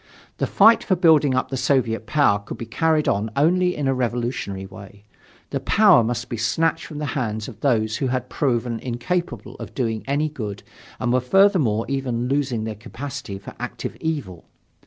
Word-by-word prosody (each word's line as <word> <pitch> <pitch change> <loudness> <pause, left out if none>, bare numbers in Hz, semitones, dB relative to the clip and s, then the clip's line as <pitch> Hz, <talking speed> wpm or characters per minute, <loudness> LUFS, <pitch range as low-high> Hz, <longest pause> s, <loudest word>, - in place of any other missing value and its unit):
The - - 0
fight 225 +3 +5
for 190 - +2
building 155 -6 +4
up 130 0 0
the 135 - -3
Soviet 115 -5 0
power 145 -10 +3
could 100 - -8
be 115 - -6
carried 155 +6 +1
on 105 +3 +1
only 180 +5 +2
in 145 -2 -2
a 135 - +2
revolutionary 120 -5 -2
way. 100 +1 -13 0.5
The - - -1
power 120 - +5
must 120 +1 -2
be 120 - -4
snatched 160 +9 0
from 150 - -8
the 150 - -3
hands 110 -6 -2
of 115 -5 -10
those 110 -5 +1
who 135 - -1
had 125 0 -2
proven 120 -4 -1
incapable 130 +9 -3
of - - -9
doing 115 -4 -1
any 145 +3 +1
good 110 -9 -6 0.4
and 120 - 0
were 130 - +4
furthermore 140 - +3
even 125 -3 -2
losing 135 -4 0
their 110 0 -3
capacity 115 +1 -7
for 100 - -10
active - - -5
evil. 140 - -4
125 Hz, 180 wpm, -22 LUFS, 110-145 Hz, 0.5 s, fight